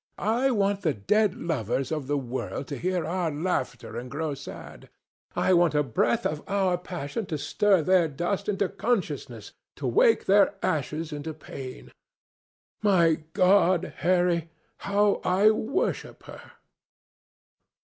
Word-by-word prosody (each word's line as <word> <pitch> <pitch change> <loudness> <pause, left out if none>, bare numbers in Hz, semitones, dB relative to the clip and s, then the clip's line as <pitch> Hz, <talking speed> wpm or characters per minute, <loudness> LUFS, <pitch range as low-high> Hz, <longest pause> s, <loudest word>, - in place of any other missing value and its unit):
I 235 +7 +1
want 200 -4 +1
the 155 -8 0
dead 205 - +2
lovers 135 - -2
of 150 -4 -3
the 145 +1 0
world 130 +1 -4
to 145 - -3
hear 180 -2 -1
our 175 0 -1
laughter 145 -8 -3
and 125 +1 -8
grow 150 +3 -3
sad. 140 0 -10 0.5
I 185 - +2
want 170 -3 +3
a 150 - +3
breath 120 -2 0
of 150 0 -1
our 195 -2 +2
passion 180 +3 -5
to 160 -5 -3
stir 185 +5 +2
their 180 0 +4
dust 175 +8 -2
into 200 -1 +1
consciousness, 220 +1 -3 0.2
to - - -6
wake 465 0 +3
their 200 +1 +4
ashes 155 +2 -2
into 150 +1 -5
pain. 130 - -9 0.9
My 170 -7 +3
God, 185 -2 +3
Harry, 175 -2 +1 0.3
how 205 0 +1
I 195 +4 +4
worship 220 +4 -2
her!" - - -12
175 Hz, 140 wpm, -26 LUFS, 150-200 Hz, 0.9 s, their